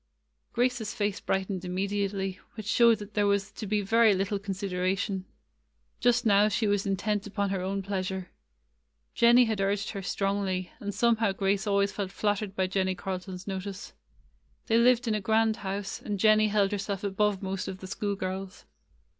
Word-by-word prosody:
Grace's 240 Hz, -3 st, 0 dB
face 205 Hz, -1 st, -1 dB
brightened 190 Hz, -1 st, -2 dB
immediately, 195 Hz, +1 st, -2 dB, 0.2 s
which 215 Hz, -2 st, -7 dB
showed 230 Hz, +1 st, +5 dB
that 210 Hz, 0 st, -10 dB
there 205 Hz, -1 st, +2 dB
was 200 Hz, -1 st, +1 dB
to 215 Hz, -, -7 dB
be 210 Hz, +1 st, +1 dB
very 220 Hz, +1 st, +4 dB
little 195 Hz, +2 st, -1 dB
consid 195 Hz, -1 st, -4 dB
eration. 185 Hz, +1 st, -1 dB, 0.7 s
Just 245 Hz, 0 st, +3 dB
now 205 Hz, -1 st, +5 dB
she 215 Hz, +2 st, 0 dB
was 205 Hz, -1 st, +1 dB
intent 205 Hz, +2 st, -1 dB
upon 200 Hz, -1 st, -1 dB
her 190 Hz, -2 st, -1 dB
own 195 Hz, +1 st, -2 dB
pleasure. 190 Hz, -1 st, -3 dB, 0.8 s
Jennie 240 Hz, +1 st, +6 dB
had 220 Hz, -3 st, -1 dB
urged 200 Hz, +1 st, 0 dB
her 200 Hz, -, -5 dB
strongly, 195 Hz, -2 st, -1 dB
and 205 Hz, -, -4 dB
somehow 225 Hz, 0 st, +2 dB
Grace 195 Hz, +2 st, 0 dB
always 200 Hz, 0 st, +2 dB
felt 200 Hz, -2 st, -3 dB
flattered 205 Hz, -1 st, -1 dB
by 190 Hz, -, +1 dB
Jennie 185 Hz, 0 st, 0 dB
Carlton's 185 Hz, 0 st, -6 dB
notice. 195 Hz, 0 st, -6 dB, 0.7 s
They 230 Hz, 0 st, +3 dB
lived 245 Hz, 0 st, +4 dB
in 220 Hz, -, +2 dB
a 215 Hz, -, -1 dB
grand 220 Hz, +2 st, +2 dB
house, 195 Hz, 0 st, -4 dB
and 205 Hz, -1 st, -3 dB
Jennie 215 Hz, +1 st, +5 dB
held 205 Hz, -1 st, +2 dB
herself 200 Hz, -1 st, -3 dB
above 200 Hz, 0 st, 0 dB
most 190 Hz, 0 st, -3 dB
of 190 Hz, -, -5 dB
the 190 Hz, -, -10 dB
school 200 Hz, +2 st, -2 dB
girls. 190 Hz, 0 st, -5 dB
200 Hz, 170 wpm, -28 LUFS, 190-215 Hz, 0.8 s, Jennie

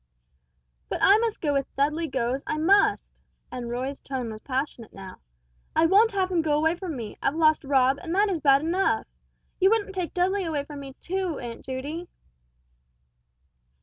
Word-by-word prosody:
"But -, -, -2 dB
I 405 Hz, +2 st, +7 dB
must 455 Hz, -2 st, -2 dB
go 295 Hz, -4 st, +1 dB
if 275 Hz, -1 st, 0 dB
Dudley 300 Hz, +4 st, 0 dB
goes, 260 Hz, -1 st, -1 dB
I 305 Hz, -, -1 dB
must!" 385 Hz, +6 st, +2 dB, 0.3 s
and 250 Hz, -2 st, -5 dB
Roy's 260 Hz, +3 st, -4 dB
tone 255 Hz, -4 st, -4 dB
was 215 Hz, 0 st, -9 dB
passionate 260 Hz, -4 st, -4 dB
now. 190 Hz, -1 st, -10 dB, 0.6 s
"I 320 Hz, -, +4 dB
won't 415 Hz, +6 st, +5 dB
have 375 Hz, -1 st, 0 dB
him 345 Hz, -2 st, +2 dB
go 300 Hz, -2 st, +1 dB
away 320 Hz, +2 st, +2 dB
from 345 Hz, -4 st, -5 dB
me 225 Hz, -3 st, -7 dB
I've 280 Hz, -, 0 dB
lost 310 Hz, -1 st, +3 dB
Rob, 270 Hz, -1 st, +3 dB
and 345 Hz, -1 st, -4 dB
that 410 Hz, +2 st, +4 dB
is 370 Hz, -5 st, -1 dB
bad 275 Hz, -2 st, +4 dB
enough 350 Hz, +5 st, +1 dB, 0.5 s
You 380 Hz, 0 st, +5 dB
wouldn't 415 Hz, -3 st, 0 dB
take 365 Hz, -4 st, -4 dB
Dudley 380 Hz, +2 st, +1 dB
away 310 Hz, -4 st, -2 dB
from 290 Hz, 0 st, -9 dB
me, 270 Hz, -1 st, -9 dB
too, 370 Hz, -3 st, -2 dB
Aunt 235 Hz, -1 st, -7 dB
Judy!" 285 Hz, +7 st, -5 dB
310 Hz, 180 wpm, -26 LUFS, 265-365 Hz, 0.6 s, I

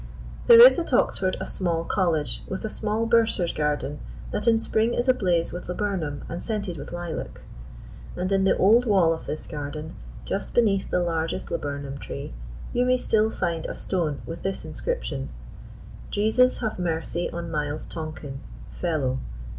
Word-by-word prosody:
There 470 Hz, -1 st, +10 dB
is -, -, +7 dB
at 330 Hz, -5 st, -3 dB
Oxford 185 Hz, -5 st, +2 dB
a -, -, -3 dB
small 170 Hz, -3 st, -1 dB
college, 165 Hz, -7 st, +1 dB
with 190 Hz, +3 st, -4 dB
a 215 Hz, -, -3 dB
small 215 Hz, +1 st, -1 dB
bursar's 225 Hz, -7 st, +3 dB
garden 150 Hz, -1 st, -1 dB, 0.3 s
that 210 Hz, +3 st, -1 dB
in 230 Hz, -1 st, +6 dB
spring 225 Hz, +1 st, +1 dB
is 240 Hz, -, 0 dB
ablaze 180 Hz, -11 st, +2 dB
with 175 Hz, 0 st, -7 dB
laburnum 180 Hz, -6 st, -2 dB
and 170 Hz, +2 st, -5 dB
scented 205 Hz, -6 st, -3 dB
with 145 Hz, -, -8 dB
lilac; 175 Hz, -2 st, -5 dB, 0.7 s
and 185 Hz, +2 st, -2 dB
in 195 Hz, -1 st, +3 dB
the 195 Hz, -, +3 dB
old 230 Hz, +6 st, +5 dB
wall 185 Hz, -6 st, +4 dB
of 160 Hz, -, -8 dB
this 155 Hz, -, -4 dB
garden, 150 Hz, +1 st, -6 dB, 0.3 s
just -, -, -3 dB
beneath 205 Hz, -5 st, +3 dB
the 180 Hz, -, +1 dB
largest 165 Hz, -1 st, -2 dB
laburnum 140 Hz, -1 st, -4 dB
tree, -, -, -7 dB, 0.4 s
you 245 Hz, -, +2 dB
may 255 Hz, 0 st, +3 dB
still 220 Hz, -3 st, +2 dB
find 165 Hz, -6 st, -2 dB
a -, -, -5 dB
stone 165 Hz, -7 st, -2 dB
with 165 Hz, -, -7 dB
this 195 Hz, 0 st, -3 dB
inscription: -, -, -3 dB, 0.8 s
"_Jesus 220 Hz, +6 st, +3 dB
have 220 Hz, -5 st, -2 dB
mercy 170 Hz, 0 st, -2 dB
on 170 Hz, -1 st, -5 dB
Miles 150 Hz, -1 st, -2 dB
Tonken, 155 Hz, -4 st, -6 dB, 0.3 s
Fellow. 145 Hz, -7 st, -1 dB
180 Hz, 160 wpm, -25 LUFS, 160-220 Hz, 0.8 s, There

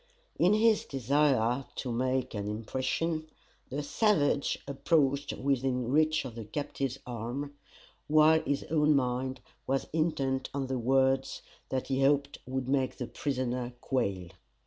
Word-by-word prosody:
In 185 Hz, +5 st, +5 dB
his 220 Hz, 0 st, +4 dB
desire 135 Hz, -2 st, +1 dB
to 125 Hz, -, -3 dB
make 130 Hz, +1 st, 0 dB
an 105 Hz, -1 st, -3 dB
impression, 130 Hz, +9 st, -2 dB, 0.4 s
the 145 Hz, +3 st, -3 dB
savage 145 Hz, -5 st, +2 dB
approached 140 Hz, 0 st, +1 dB
within 130 Hz, -2 st, 0 dB
reach 155 Hz, 0 st, +3 dB
of 125 Hz, -, -6 dB
the 115 Hz, -1 st, -7 dB
captive's 135 Hz, +2 st, -3 dB
arm, 125 Hz, +4 st, -4 dB, 0.5 s
while 155 Hz, +1 st, +5 dB
his 140 Hz, -1 st, -1 dB
own 150 Hz, -1 st, +4 dB
mind 130 Hz, 0 st, -1 dB, 0.3 s
was 135 Hz, +1 st, 0 dB
intent 135 Hz, -5 st, 0 dB
on 140 Hz, -1 st, -1 dB
the 130 Hz, -1 st, -2 dB
words 135 Hz, +2 st, +1 dB, 0.3 s
that 130 Hz, 0 st, -2 dB
he 135 Hz, 0 st, +1 dB
hoped 140 Hz, +1 st, +2 dB
would 130 Hz, 0 st, -3 dB
make 135 Hz, -1 st, 0 dB
the 125 Hz, -, -3 dB
prisoner 125 Hz, -1 st, -2 dB
quail. 95 Hz, -10 st, -1 dB
135 Hz, 135 wpm, -30 LUFS, 125-145 Hz, 0.5 s, In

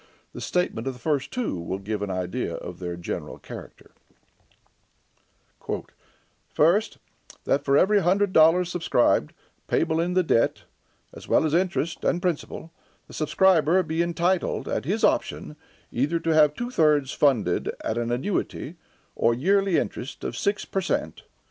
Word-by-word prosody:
The -, -, -8 dB
statement 135 Hz, -9 st, -1 dB
of 135 Hz, -, -1 dB
the 125 Hz, -, -14 dB
first 140 Hz, +1 st, -1 dB
two 240 Hz, -, -3 dB
will 85 Hz, +3 st, -4 dB
give 105 Hz, +1 st, -4 dB
an 100 Hz, -, -3 dB
idea 90 Hz, +1 st, -3 dB
of 90 Hz, -1 st, -8 dB
their 90 Hz, -1 st, -4 dB
general 85 Hz, 0 st, -6 dB
character: -, -, -11 dB, 2.6 s
"First, -, -, +2 dB, 0.5 s
That, 140 Hz, -, +1 dB
for 140 Hz, 0 st, +3 dB
every 205 Hz, +5 st, +4 dB
hundred 190 Hz, +2 st, +2 dB
dollars 170 Hz, +3 st, +5 dB
subscribed, 125 Hz, -, +2 dB, 0.4 s
payable 160 Hz, -, +1 dB
in 175 Hz, +2 st, 0 dB
the 185 Hz, -, +4 dB
debt, 115 Hz, -8 st, +1 dB, 0.5 s
(as -, -, -11 dB
well -, -, +3 dB
interest 170 Hz, -2 st, 0 dB
as 175 Hz, -, +1 dB
principal,) 170 Hz, -2 st, -3 dB, 0.4 s
the -, -, -14 dB
subscriber 180 Hz, +2 st, +3 dB
be 160 Hz, 0 st, -1 dB
entitled, 170 Hz, +2 st, 0 dB
at -, -, -2 dB
his -, -, -1 dB
option, 75 Hz, -, 0 dB, 0.4 s
either 150 Hz, +7 st, 0 dB
to 165 Hz, 0 st, 0 dB
have 150 Hz, -1 st, +5 dB
two 240 Hz, +1 st, -4 dB
thirds 150 Hz, -, +3 dB
funded 120 Hz, -11 st, +1 dB
at 110 Hz, -, -1 dB
an 120 Hz, 0 st, -2 dB
annuity 150 Hz, +3 st, -3 dB, 0.4 s
or 115 Hz, 0 st, +2 dB
yearly 195 Hz, +6 st, +2 dB
interest 130 Hz, -, -4 dB
of -, -, -4 dB
six 200 Hz, +1 st, -1 dB
per 195 Hz, -, -2 dB
cent. 190 Hz, -, -2 dB
155 Hz, 150 wpm, -25 LUFS, 120-180 Hz, 2.6 s, dollars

